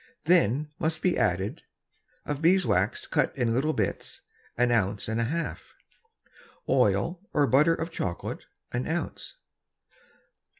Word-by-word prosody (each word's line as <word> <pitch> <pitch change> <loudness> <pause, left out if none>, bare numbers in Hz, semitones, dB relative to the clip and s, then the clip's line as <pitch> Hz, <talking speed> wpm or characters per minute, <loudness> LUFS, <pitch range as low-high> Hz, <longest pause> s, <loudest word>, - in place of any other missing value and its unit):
Then 150 - +3
must 160 0 -1
be 180 - +3
added, 95 0 0 0.6
Of 145 0 -3
Bees 180 +3 +4
Wax 95 +6 +1
cut - - 0
in 120 -3 +1
little 140 +6 +1
Bits, 105 -7 -3 0.4
an 120 0 +3
Ounce 105 -3 0
and 110 +1 -1
a - - +1
half. 165 +7 -4 0.9
Oil 175 +1 +2
or 145 - +4
Butter 150 +5 +4
of 165 +1 -4
Chocolate, 90 - -4 0.2
an 125 +1 -2
Ounce. 175 - -4
135 Hz, 130 wpm, -27 LUFS, 110-165 Hz, 0.9 s, Bees